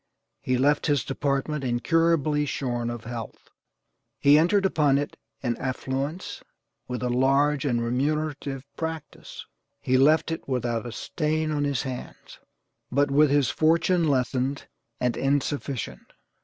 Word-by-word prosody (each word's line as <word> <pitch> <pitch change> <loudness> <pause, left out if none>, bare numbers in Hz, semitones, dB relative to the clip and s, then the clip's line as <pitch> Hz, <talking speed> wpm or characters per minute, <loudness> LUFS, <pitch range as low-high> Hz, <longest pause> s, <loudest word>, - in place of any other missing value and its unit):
He 130 0 0
left 145 +4 +2
his 145 -5 +2
department 140 +2 -1
incurably 150 +3 +2
shorn 120 -4 -2
of 120 -1 -6
health. 115 -2 -8 0.7
He 145 +1 +6
entered 195 +5 +3
upon 150 -7 +3
it 145 0 -3 0.3
in 120 -2 0
affluence, 135 +5 -3 0.5
with 125 0 -4
a 125 - 0
large 135 +4 +2
and 120 -4 +1
remunerative 140 +2 -2
practice. 160 -2 -6 0.3
He 130 0 +2
left 155 +4 +4
it 165 - -5
without 120 -2 -1
a - - -6
stain 155 +4 -1
on 145 -1 0
his 140 -4 -1
hands, 130 -2 -8 0.5
but 140 +2 +2
with 150 +1 +5
his 140 -3 +3
fortune 165 +2 +2
lessened 130 0 0 0.3
and 125 -2 0
insufficient. 140 -2 -2
140 Hz, 130 wpm, -26 LUFS, 125-150 Hz, 0.7 s, He